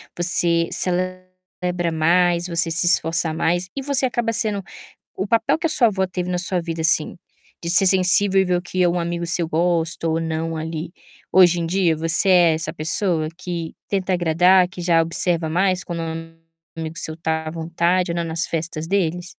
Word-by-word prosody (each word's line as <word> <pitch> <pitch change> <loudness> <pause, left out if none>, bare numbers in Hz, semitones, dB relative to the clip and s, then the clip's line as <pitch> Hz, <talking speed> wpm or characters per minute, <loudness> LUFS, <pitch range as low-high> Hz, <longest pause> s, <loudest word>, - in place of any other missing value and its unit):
você 170 -1 +5
celebra 185 -1 -3
mais, 170 +2 +1
você 170 -1 +1
se 170 +2 +3
esforça 165 -1 +1
mais 175 +3 -1
e 275 - -4
você 275 -1 0
acaba 240 -2 -1
sendo 215 -4 -1 0.6
o 195 - -3
papel 230 +6 +1
que 330 - -1
a 320 - -1
sua 245 -6 +6
avó 190 -2 -1
teve 180 0 -5
na 180 0 -2
sua 180 0 -2
vida, 165 -1 -6
assim, 160 0 +1 0.5
de 170 - -3
ser 190 +2 +5
sensível 190 +1 +4
e - - +2
ver 180 -1 0
o 175 - -3
que 185 0 -1
um 175 +1 0
amigo 170 0 -3
seu 170 -1 -1
gosta 165 0 -1
ou 160 +1 -1
não 165 0 -3
ali? 160 +1 -5 0.4
Hoje 175 -2 +5
em 165 - -2
dia, 170 -2 +1
você 165 +4 0
é 175 -3 +5
essa 160 0 -3
pessoa 160 0 -1
que 170 -3 -6
tenta 190 -1 -2
agradar, 180 +2 +3
que 180 - -11
já 170 -1 +3
observa 170 0 -1
mais, 185 +2 0
quando 170 -1 -5
um 165 0 -7 0.4
amigo 160 0 -6
seu 160 - -5
está 160 -1 -3
à - - -4
vontade 170 +2 -1
ou 170 - -3
não 170 - -2
nas 165 0 -3
festas 160 -1 -4
deles? 180 -3 -1
175 Hz, 190 wpm, -20 LUFS, 165-185 Hz, 0.6 s, sua